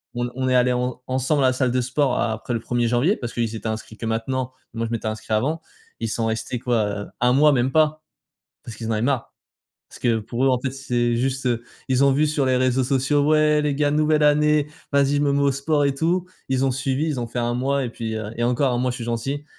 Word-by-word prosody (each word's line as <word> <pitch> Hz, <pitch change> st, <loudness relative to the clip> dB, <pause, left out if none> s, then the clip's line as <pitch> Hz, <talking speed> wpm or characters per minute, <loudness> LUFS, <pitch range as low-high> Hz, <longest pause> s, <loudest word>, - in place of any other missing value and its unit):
on 120 Hz, -, -1 dB
n 120 Hz, -, -5 dB
on 130 Hz, 0 st, -1 dB
est 130 Hz, -, +3 dB
allé 125 Hz, 0 st, +4 dB
en 125 Hz, 0 st, -2 dB
ensemble 135 Hz, +2 st, +1 dB
à -, -, +5 dB
la 130 Hz, -, +2 dB
salle 130 Hz, -1 st, 0 dB
de 125 Hz, 0 st, +1 dB
sport 130 Hz, +1 st, 0 dB
a 110 Hz, -, 0 dB
après 110 Hz, +2 st, -5 dB
le 115 Hz, -, 0 dB
1er 120 Hz, +1 st, -1 dB
janvier 125 Hz, -, +2 dB
parce 120 Hz, -1 st, -6 dB
qu'ils 115 Hz, -2 st, -1 dB
s'étaient 110 Hz, 0 st, -6 dB
inscrits 110 Hz, 0 st, -6 dB
que 115 Hz, -, -6 dB
maintenant, 125 Hz, +3 st, -2 dB, 0.2 s
et -, -, -7 dB
moi, 115 Hz, -, -1 dB
je -, -, -8 dB
m'étais 115 Hz, -1 st, -2 dB
inscrit 110 Hz, 0 st, -4 dB
avant, 150 Hz, +9 st, +1 dB, 0.4 s
ils 115 Hz, -1 st, -2 dB
sont 115 Hz, +1 st, -1 dB
restés 115 Hz, +2 st, -3 dB
quoi, 120 Hz, -3 st, +1 dB, 0.2 s
heu, -, -, -13 dB
1 125 Hz, 0 st, +4 dB
mois 150 Hz, +2 st, +5 dB
même 130 Hz, +1 st, +1 dB
pas, 155 Hz, 0 st, +2 dB, 0.6 s
parce 115 Hz, -, -8 dB
qu'ils 115 Hz, -, -5 dB
en -, -, -1 dB
avaient 110 Hz, -1 st, 0 dB
marre. 130 Hz, -2 st, 0 dB, 0.6 s
Parce -, -, -13 dB
que 115 Hz, -2 st, +2 dB
pour 115 Hz, +4 st, -2 dB
eux, -, -, +4 dB
en 125 Hz, -2 st, +2 dB
fait, 130 Hz, -, -2 dB
c'est 120 Hz, -3 st, 0 dB
juste, 130 Hz, +1 st, -1 dB
heu, 120 Hz, -1 st, 0 dB, 0.2 s
ils 130 Hz, +1 st, +3 dB
ont 140 Hz, -, +5 dB
vu 150 Hz, +3 st, +2 dB
sur 150 Hz, -2 st, 0 dB
les 130 Hz, -1 st, +2 dB
réseaux 130 Hz, 0 st, +2 dB, 0.4 s
«Ouais, 150 Hz, 0 st, +4 dB
les 145 Hz, -1 st, 0 dB
gars, 145 Hz, 0 st, +1 dB
nouvelle 150 Hz, 0 st, +2 dB
année, 150 Hz, 0 st, +4 dB, 0.3 s
vas-y, 140 Hz, 0 st, +3 dB
je 145 Hz, -, +2 dB
me 145 Hz, -1 st, +2 dB
mets 140 Hz, -, +1 dB
au 140 Hz, -, +3 dB
sport 145 Hz, +2 st, +1 dB
et 140 Hz, -, 0 dB
tout», 170 Hz, +5 st, 0 dB, 0.2 s
ils 130 Hz, 0 st, +1 dB
ont -, -, +2 dB
suivi, 135 Hz, +4 st, -1 dB
ils 145 Hz, -5 st, -2 dB
ont 120 Hz, -, -3 dB
fait 120 Hz, -, -5 dB
1 120 Hz, 0 st, 0 dB
mois 135 Hz, +2 st, 0 dB
et -, -, -2 dB
puis, 115 Hz, -1 st, -5 dB
heu 110 Hz, -1 st, -5 dB
et 120 Hz, -, -2 dB
encore, 125 Hz, +3 st, +2 dB
1 -, -, 0 dB
mois 125 Hz, 0 st, 0 dB
je 125 Hz, -, -5 dB
suis 120 Hz, -, -6 dB
gentil 120 Hz, +5 st, -3 dB
130 Hz, 275 wpm, -23 LUFS, 120-140 Hz, 0.6 s, à